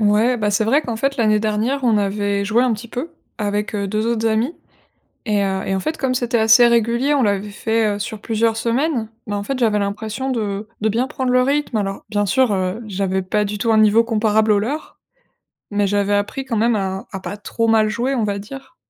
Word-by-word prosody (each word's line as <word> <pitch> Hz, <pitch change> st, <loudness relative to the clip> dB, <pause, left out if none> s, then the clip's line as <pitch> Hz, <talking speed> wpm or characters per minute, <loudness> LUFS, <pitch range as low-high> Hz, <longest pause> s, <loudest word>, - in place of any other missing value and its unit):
Ouais, 215 Hz, +4 st, +3 dB
bah, 210 Hz, -3 st, 0 dB
c'est 205 Hz, +2 st, +1 dB
vrai 275 Hz, +8 st, +3 dB
qu'en 235 Hz, -2 st, -4 dB
fait 275 Hz, +4 st, -1 dB
l'année 215 Hz, -3 st, +3 dB
dernière, 220 Hz, +6 st, -1 dB
on 230 Hz, -3 st, +3 dB
avait 200 Hz, 0 st, -1 dB
joué 225 Hz, +4 st, +2 dB
un 250 Hz, -, +2 dB
petit 225 Hz, +2 st, -6 dB
peu 255 Hz, +9 st, -5 dB, 0.3 s
avec, 210 Hz, +1 st, -2 dB
heu, 200 Hz, -1 st, -2 dB
2 215 Hz, +3 st, -1 dB
autres 225 Hz, -1 st, 0 dB
amis. 225 Hz, +7 st, +1 dB, 0.7 s
Et 210 Hz, -2 st, +1 dB
heu 190 Hz, 0 st, -1 dB
et 195 Hz, -, 0 dB
en 190 Hz, -, -1 dB
fait, 310 Hz, +11 st, -3 dB
comme 265 Hz, -2 st, -1 dB
c'était 245 Hz, -1 st, 0 dB
assez 225 Hz, +2 st, +6 dB
régulier, 235 Hz, +4 st, +2 dB
on 280 Hz, -, +2 dB
l'avait 205 Hz, -2 st, 0 dB
fait, 220 Hz, 0 st, 0 dB
heu, -, -, -6 dB
sur 215 Hz, +1 st, -5 dB
plusieurs 225 Hz, 0 st, 0 dB
semaines, 240 Hz, +1 st, 0 dB, 0.2 s
mais 205 Hz, -, -3 dB
en 200 Hz, -, -2 dB
fait 265 Hz, +5 st, -3 dB
j'avais 220 Hz, -4 st, +2 dB
l'impression 215 Hz, +6 st, -3 dB
de 210 Hz, -4 st, -2 dB
de 220 Hz, -, +1 dB
bien 235 Hz, +5 st, 0 dB
prendre 260 Hz, -2 st, -2 dB
le 255 Hz, -, +5 dB
rythme. 280 Hz, -1 st, 0 dB
Alors, 195 Hz, -1 st, -3 dB
bien 205 Hz, -1 st, 0 dB
sûr, 255 Hz, +2 st, +2 dB
heu, 185 Hz, +3 st, -2 dB
j'avais 190 Hz, -1 st, -1 dB
pas 210 Hz, +3 st, 0 dB
du 205 Hz, +1 st, -4 dB
tout 225 Hz, +2 st, +1 dB
un 220 Hz, -, +4 dB
niveau 215 Hz, +2 st, +5 dB
comparable 220 Hz, -1 st, +2 dB
aux 205 Hz, -, +3 dB
leurs, 270 Hz, +10 st, -4 dB, 0.7 s
mais 205 Hz, -1 st, +1 dB
j'avais 205 Hz, 0 st, +1 dB
appris 205 Hz, +6 st, -1 dB
quand 250 Hz, -4 st, -3 dB
même 230 Hz, +1 st, +2 dB
à 190 Hz, -1 st, -3 dB
à 190 Hz, -, -5 dB
pas 200 Hz, -, -6 dB
trop 230 Hz, +2 st, -2 dB
mal 220 Hz, -1 st, +4 dB
jouer, 240 Hz, +6 st, -1 dB
on 235 Hz, -4 st, 0 dB
va 200 Hz, -1 st, -1 dB
dire. 270 Hz, +10 st, -10 dB
220 Hz, 230 wpm, -20 LUFS, 205-240 Hz, 0.7 s, assez